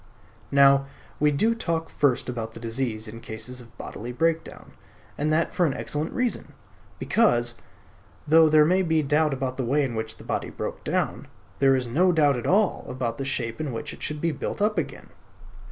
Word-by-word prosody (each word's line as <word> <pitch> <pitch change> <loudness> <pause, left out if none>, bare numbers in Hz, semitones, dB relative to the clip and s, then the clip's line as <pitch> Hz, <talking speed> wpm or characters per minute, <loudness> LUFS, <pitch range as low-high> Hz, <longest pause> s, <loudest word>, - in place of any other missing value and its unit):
Now 140 0 +5 0.3
we 150 - +4
do 215 +11 +2
talk 165 -7 -2
first 140 -4 +1
about 115 -3 -5
the - - -8
disease 115 -1 -3
in 115 +2 -9
cases 115 +3 -6
of 120 0 -17
bodily 120 +3 -7
breakdown; 165 +5 -2 0.4
and 150 +1 -1
that 160 +2 +1
for 180 -2 +2
an 135 - -2
excellent 150 +3 -3
reason. 250 -2 -2 0.4
Because, 120 - +2 0.7
though 160 +1 +6
there 155 0 +6
may 185 +4 +3
be 160 -3 +1
doubt 150 +2 +2
about 130 -1 -3
the 130 - -1
way 140 +5 +2
in 130 -3 -2
which 110 0 -4
the - - -12
body - - -2
broke - - -6
down, - - -1 0.3
there 135 -1 +5
is 130 -1 -1
no 170 +10 +3
doubt 150 -4 +3
at 120 - -4
all 200 +1 +2
about 120 -3 -3
the 135 - -2
shape 115 -2 -2
in 150 -4 -3
which 115 - -5
it - - -13
should 150 -1 -4
be 170 - +1
built 145 - -4
up 210 -2 +2
again. 165 - -6
140 Hz, 195 wpm, -25 LUFS, 120-160 Hz, 0.7 s, though